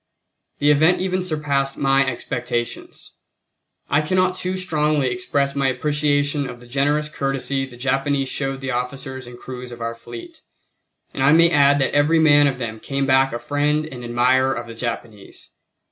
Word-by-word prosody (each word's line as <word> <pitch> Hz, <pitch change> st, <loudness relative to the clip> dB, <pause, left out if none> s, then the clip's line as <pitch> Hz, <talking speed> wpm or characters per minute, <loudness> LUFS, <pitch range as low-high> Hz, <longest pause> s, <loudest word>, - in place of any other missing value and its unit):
The 145 Hz, +1 st, +3 dB
event 160 Hz, +5 st, +4 dB
even 185 Hz, 0 st, -1 dB
surpassed 145 Hz, -5 st, -1 dB
my 135 Hz, 0 st, +3 dB
expectations. 120 Hz, -1 st, -4 dB, 0.7 s
I 145 Hz, +2 st, +2 dB
cannot 185 Hz, +3 st, +1 dB
too 185 Hz, +1 st, -3 dB
strongly 150 Hz, -6 st, +1 dB
express 140 Hz, -6 st, -1 dB
my 140 Hz, -1 st, +1 dB
appreciation 145 Hz, 0 st, 0 dB
of 120 Hz, -, -9 dB
the 120 Hz, -, -15 dB
generous 145 Hz, +4 st, 0 dB
courtesy 135 Hz, -2 st, -2 dB
the 125 Hz, -2 st, -13 dB
Japanese 135 Hz, +1 st, 0 dB
showed 135 Hz, 0 st, -3 dB
the 135 Hz, 0 st, -3 dB
officers 130 Hz, +1 st, -4 dB
and 120 Hz, 0 st, -11 dB
crews 125 Hz, 0 st, -8 dB
of 120 Hz, -, -9 dB
our 115 Hz, 0 st, -3 dB
fleet; 325 Hz, -, -11 dB, 0.7 s
and -, -, -4 dB
I 135 Hz, +3 st, +5 dB
may 170 Hz, +1 st, +5 dB
add 145 Hz, -2 st, +5 dB
that 135 Hz, -, 0 dB
every 145 Hz, +3 st, +3 dB
man 145 Hz, -2 st, +5 dB
of 135 Hz, -2 st, -1 dB
them 110 Hz, -3 st, -5 dB
came 140 Hz, +2 st, -2 dB
back 135 Hz, 0 st, +3 dB
a 120 Hz, -, -3 dB
friend 150 Hz, +3 st, 0 dB
and 130 Hz, -6 st, -9 dB
admirer 125 Hz, +2 st, +2 dB
of 120 Hz, -, -5 dB
the 115 Hz, -, -9 dB
Japanese. 115 Hz, -3 st, -7 dB
140 Hz, 170 wpm, -21 LUFS, 125-150 Hz, 0.7 s, I